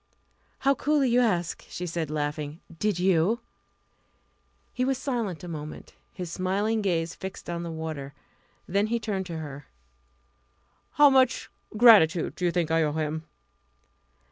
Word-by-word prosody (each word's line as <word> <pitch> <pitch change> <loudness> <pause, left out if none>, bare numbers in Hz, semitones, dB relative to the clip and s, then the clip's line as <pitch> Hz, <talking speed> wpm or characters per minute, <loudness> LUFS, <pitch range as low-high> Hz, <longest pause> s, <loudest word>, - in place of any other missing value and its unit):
"How 275 +1 +4
coolly 280 -2 +1
you 245 - +4
ask!" 175 -8 0
she 180 - -5
said, 170 -3 -3
laughing. 150 0 -3 0.2
"Did 210 -4 +1
you?" 185 +4 +2 1.3
He 250 - -1
was 265 0 +1
silent 230 - -3
a - - -6
moment, 155 -2 -7 0.2
his 180 -3 -6
smiling 200 +5 0
gaze 170 -4 0
fixed 190 0 -8
on 170 0 -3
the 170 - -5
water. 155 -4 -6 0.5
Then 200 +3 +1
he 235 +1 0
turned 195 -4 -3
to 165 -3 -5
her. 145 -3 -8 1.3
"How 290 -1 +7
much 260 -1 +3 0.3
gratitude 200 -8 +6
do 180 - -3
you 175 - +3
think 170 -2 0
I 165 0 +3
owe 150 -2 +1
him?" 155 0 -2
175 Hz, 145 wpm, -27 LUFS, 160-220 Hz, 1.3 s, How